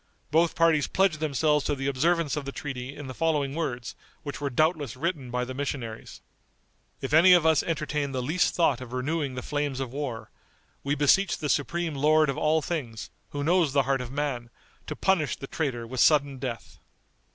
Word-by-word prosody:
Both 165 Hz, +2 st, +3 dB
parties 165 Hz, -3 st, +3 dB
pledged 190 Hz, -5 st, +1 dB
themselves 150 Hz, 0 st, +1 dB
to 145 Hz, -, 0 dB
the 135 Hz, 0 st, -5 dB
observance 155 Hz, +3 st, +1 dB
of 150 Hz, -2 st, -4 dB
the 140 Hz, -, -4 dB
treaty 135 Hz, -1 st, -6 dB
in 145 Hz, -, -8 dB
the 130 Hz, -, -6 dB
following 145 Hz, -2 st, 0 dB
words, 135 Hz, -7 st, -4 dB, 0.3 s
which 145 Hz, -1 st, -6 dB
were 140 Hz, -, -1 dB
doubtless 150 Hz, -2 st, 0 dB
written 145 Hz, -2 st, -3 dB
by 125 Hz, 0 st, -1 dB
the 130 Hz, -, -6 dB
missionaries: 130 Hz, -5 st, -5 dB, 0.8 s
"If 135 Hz, +2 st, -4 dB
any 175 Hz, +4 st, +8 dB
of 175 Hz, -3 st, +5 dB
us 160 Hz, -2 st, +4 dB
entertain 150 Hz, -3 st, -2 dB
the 130 Hz, -2 st, -2 dB
least 175 Hz, +7 st, +1 dB
thought 145 Hz, -7 st, +2 dB
of 125 Hz, -1 st, -9 dB
renewing 140 Hz, +1 st, -2 dB
the 130 Hz, -, -5 dB
flames 145 Hz, -2 st, -2 dB
of 130 Hz, -2 st, -4 dB
war, 135 Hz, -6 st, -5 dB, 0.5 s
we 140 Hz, +1 st, 0 dB
beseech 170 Hz, +6 st, +3 dB
the 150 Hz, -, -3 dB
supreme 170 Hz, +3 st, 0 dB
Lord 150 Hz, +1 st, +3 dB
of 135 Hz, -, -7 dB
all 155 Hz, 0 st, +2 dB
things, 125 Hz, -10 st, -4 dB, 0.2 s
who 145 Hz, 0 st, -4 dB
knows 165 Hz, -2 st, +2 dB
the 140 Hz, -1 st, +4 dB
heart 135 Hz, 0 st, 0 dB
of 125 Hz, -1 st, -7 dB
man, 135 Hz, -5 st, -3 dB, 0.4 s
to -, -, -4 dB
punish 185 Hz, -7 st, +1 dB
the -, -, -8 dB
traitor 135 Hz, -5 st, -3 dB
with 125 Hz, +2 st, -6 dB
sudden 140 Hz, -2 st, +4 dB
death." 125 Hz, -3 st, -6 dB
145 Hz, 195 wpm, -27 LUFS, 130-155 Hz, 0.8 s, any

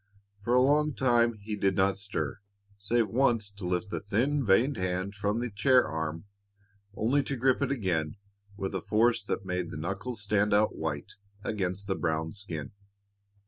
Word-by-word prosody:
For 120 Hz, +3 st, +2 dB
a 125 Hz, -, +6 dB
long 150 Hz, +2 st, +3 dB
time 120 Hz, -2 st, +3 dB
he 105 Hz, +1 st, -5 dB
did 95 Hz, -2 st, +1 dB
not 95 Hz, +1 st, +2 dB
stir, 105 Hz, 0 st, -3 dB, 0.4 s
save 110 Hz, +2 st, +1 dB
once 115 Hz, -3 st, +2 dB
to 100 Hz, -3 st, -6 dB
lift 90 Hz, +3 st, -1 dB
the -, -, -2 dB
thin, 125 Hz, +8 st, 0 dB
veined 120 Hz, +7 st, +3 dB
hand 95 Hz, +2 st, -2 dB
from 105 Hz, +2 st, -1 dB
the 120 Hz, -1 st, -3 dB
chair 125 Hz, +5 st, +4 dB
arm, 80 Hz, +2 st, -4 dB, 0.7 s
only 125 Hz, +8 st, +2 dB
to 140 Hz, -, -3 dB
grip 130 Hz, +1 st, +2 dB
it -, -, +1 dB
again 90 Hz, -, -1 dB, 0.4 s
with 95 Hz, -2 st, -3 dB
a -, -, -2 dB
force 115 Hz, +2 st, +2 dB
that 100 Hz, -1 st, -3 dB
made 90 Hz, -2 st, -2 dB
the -, -, -6 dB
knuckles 95 Hz, +8 st, -4 dB
stand 105 Hz, 0 st, +2 dB
out 105 Hz, +1 st, +2 dB
white 75 Hz, -3 st, -4 dB, 0.3 s
against 95 Hz, -1 st, -2 dB
the 100 Hz, -, 0 dB
brown 80 Hz, -2 st, -1 dB
skin. 85 Hz, -8 st, -6 dB
100 Hz, 175 wpm, -29 LUFS, 95-120 Hz, 0.7 s, a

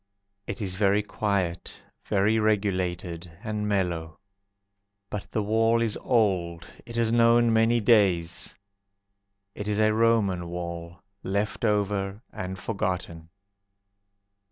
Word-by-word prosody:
It 100 Hz, +2 st, -4 dB
is 95 Hz, -2 st, -1 dB
very 100 Hz, +1 st, +2 dB
quiet, 100 Hz, -5 st, -2 dB, 0.2 s
Very 105 Hz, +2 st, +2 dB
regulated 90 Hz, -5 st, -1 dB
and 105 Hz, -2 st, -2 dB
mellow. 85 Hz, -5 st, -1 dB, 0.9 s
But 105 Hz, -1 st, -5 dB
the 110 Hz, -, 0 dB
wall 115 Hz, +2 st, +3 dB
is 115 Hz, -2 st, 0 dB
old, 90 Hz, -8 st, 0 dB, 0.2 s
It 115 Hz, -, -8 dB
has 115 Hz, -1 st, +1 dB
known 115 Hz, 0 st, +4 dB
many 115 Hz, +1 st, +4 dB
days. 95 Hz, -7 st, +2 dB, 1.0 s
It 105 Hz, -, -6 dB
is 105 Hz, -1 st, 0 dB
a 110 Hz, 0 st, +4 dB
Roman 110 Hz, -6 st, +2 dB
wall, 85 Hz, -1 st, -6 dB, 0.2 s
Left 100 Hz, +4 st, -2 dB
over 100 Hz, -1 st, 0 dB
and 95 Hz, +1 st, -5 dB
forgotten. 90 Hz, -5 st, -3 dB
100 Hz, 110 wpm, -26 LUFS, 90-110 Hz, 1.0 s, known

